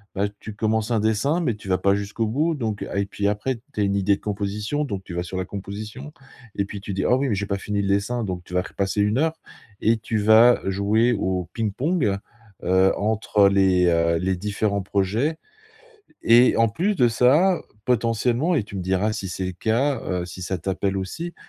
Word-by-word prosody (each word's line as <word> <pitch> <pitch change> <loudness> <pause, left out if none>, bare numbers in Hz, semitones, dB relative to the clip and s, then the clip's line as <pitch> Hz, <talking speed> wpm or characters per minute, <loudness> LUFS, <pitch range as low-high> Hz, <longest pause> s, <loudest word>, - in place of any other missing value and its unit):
bah, 100 +1 +1
tu 110 - -8
commences 110 +1 -1
un 115 - +2
dessin 110 +10 +1
mais 120 -10 0
tu 100 - -13
vas 95 -1 +1
pas 100 +1 +3
jusqu'au 100 +3 -2
bout 150 +9 +1
donc 110 -8 -3
a 100 - -3
et 100 - +1
puis, 100 0 -2
après, 105 +6 -1 0.2
tu - - -6
as - - +3
une 100 0 +1
idée 100 0 +2
de - - -15
composition, 105 +7 -2
donc 100 -7 -5
tu 90 - -9
vas 90 - -1
sur 95 +1 -6
la 95 - -2
composition 105 +9 -7 0.4
et 100 - 0
puis 100 0 -7
tu 100 -1 -5
dis: 95 - -1
«Ah 125 - +4
oui, 135 -1 0
mais 105 - +1
j'ai 100 +1 -3
pas 100 - -1
fini 100 +1 -2
le 100 - -2
dessin!» 100 +5 0
Donc 90 -3 -4
tu 90 - -13
vas 90 - +2
repasser 100 +1 -2
1 105 +4 +1
heure 160 +2 +1 0.5
et 115 +1 +3
tu 110 0 -3
vas 110 +3 +6
jouer 105 +5 +2
au 95 -4 -2
ping-pong, 115 - 0 0.4
heu, 95 +2 +3
entre 105 -1 +2
les, 95 -2 +3
heu, 85 0 +2
les 95 +2 0
différents 100 0 -1
projets 105 - 0 0.9
et 120 +2 +5
en 115 0 +4
plus 190 - -1
de 125 -6 +4
ça, 145 +11 +3 0.2
potentiellement 120 +6 +1
et 115 - 0
tu 100 - -12
me 95 - -3
diras, 95 +4 0
si 100 -3 -4
c'est 95 +2 -4
le 90 - -3
cas, 115 +8 0
heu, 90 -2 -2
si 90 +1 -9
ça 95 0 -3
t'appelle 95 +2 -2
aussi, 165 - -5
105 Hz, 220 wpm, -23 LUFS, 95-115 Hz, 0.9 s, vas